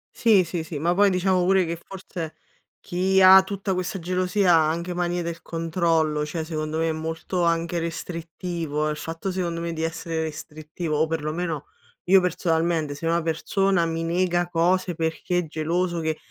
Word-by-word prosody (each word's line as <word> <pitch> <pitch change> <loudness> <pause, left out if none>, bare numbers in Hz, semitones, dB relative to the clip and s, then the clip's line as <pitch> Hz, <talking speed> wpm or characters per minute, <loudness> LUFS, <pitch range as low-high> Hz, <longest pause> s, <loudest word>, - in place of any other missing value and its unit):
Sì, 215 -5 +5
sì, 170 -1 -4
sì, 160 -1 -6
ma 170 +4 +1
poi 200 +2 +4
diciamo 185 0 +2
pure 190 0 +4
che 170 0 -3
forse 180 -4 -7 0.5
chi 190 +2 +1
ha 190 0 +10
tutta 195 0 -3
questa 185 +1 -2
gelosia 180 +1 +1
ha 160 -2 +4
anche 170 +3 -3
manie 175 0 -1
del 170 0 -5
controllo, 165 -2 0
cioè 160 +2 -4
secondo 155 -1 -3
me 165 0 +1
è - - +1
molto 160 +3 -3
anche 170 0 +1
restrittivo, 165 -2 -3
il 150 - -3
fatto 165 +5 -4
secondo 175 -2 -2
me 170 0 -3
di 160 -1 -4
essere 165 0 -3
restrittivo 155 +1 -5
o 160 +2 +2
perlomeno 160 -1 -3 0.4
io 190 +2 +6
personalmente 165 -3 0
se 145 +3 -7
una 170 +1 +2
persona 170 +3 +1
mi 165 0 -2
nega 175 +1 0
cose 175 +1 +1
perché 165 +2 -1
è 175 - -2
geloso 170 +3 -1
che 160 -1 -1
170 Hz, 175 wpm, -24 LUFS, 160-180 Hz, 0.5 s, ha